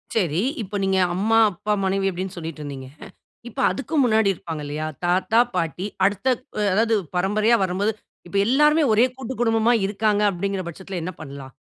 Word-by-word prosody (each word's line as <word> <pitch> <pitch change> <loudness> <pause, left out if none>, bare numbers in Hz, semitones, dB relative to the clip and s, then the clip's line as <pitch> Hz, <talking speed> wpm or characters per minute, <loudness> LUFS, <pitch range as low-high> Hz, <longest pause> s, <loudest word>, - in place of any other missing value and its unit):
சரி. 175 -6 +1 0.2
இப்ப 205 0 -6
நீங்க 190 0 +1 0.2
அம்மா, 220 +4 +2
அப்பா, 200 +4 -4
மனைவி 195 0 +1
அப்படீன்னு 185 +1 -5
சொல்லிட்டிருந்தீங்க. 150 -5 -7 0.6
"இப்ப 265 - -9
அதுக்கு 275 +4 -5
முன்னாடி 220 -4 +3
இருப்பாங்க 160 -3 -7
இல்லையா? 150 +2 -4 0.2
தாத்தா, 185 +6 +2 0.2
பாட்டி 175 +2 -2 0.2
அடுத்த 200 +5 0 0.5
அதாவது 225 +2 +2 0.2
பரம்பரையா 210 +5 +3
வரம்போது, 190 +3 0 0.4
இப்ப 200 +3 -3
எல்லோருமே 300 +5 +4
ஒரே 225 +3 +5
கூட்டு 260 -1 -6
குடும்பமா 225 0 +3
இருக்காங்க." 210 0 +1
அப்படிங்கிற 195 +1 -3
பட்சத்தில 185 +1 -6
என்ன 180 +2 -4
பண்ணலாம்? 140 -3 -9
195 Hz, 150 wpm, -23 LUFS, 175-220 Hz, 0.6 s, ஒரே